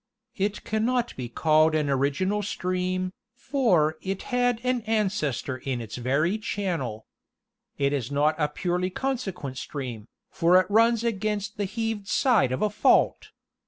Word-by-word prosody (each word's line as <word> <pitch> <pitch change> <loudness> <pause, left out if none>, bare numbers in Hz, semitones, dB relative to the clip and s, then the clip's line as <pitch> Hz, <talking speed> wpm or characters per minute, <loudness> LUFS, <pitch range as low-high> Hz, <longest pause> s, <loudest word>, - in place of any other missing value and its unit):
It 200 +1 -2
cannot 235 +2 0
be 125 -2 -5
called 155 +4 +3
an 150 -2 +1
original 145 +10 +1
stream, 185 -1 -2 0.2
for 190 - +1
it 195 0 -4
had 245 -2 +2
an 250 -1 +1
ancestor 185 - -1
in 130 -1 -3
its 115 0 -7
very 145 - +1
channel. 165 - -3 0.7
It 140 0 +1
is 130 -5 -2
not 145 +2 +2
a 150 - +2
purely 180 +4 -1
consequent 190 - -3
stream, 125 -7 -6 0.2
for 175 +2 +5
it 185 - +1
runs 230 +1 +4
against 210 -2 -2
the 205 - -1
heaved 220 0 -3
side 225 - +3
of 130 - -1
a 210 - +1
fault. 210 - +3
185 Hz, 145 wpm, -26 LUFS, 145-215 Hz, 0.7 s, for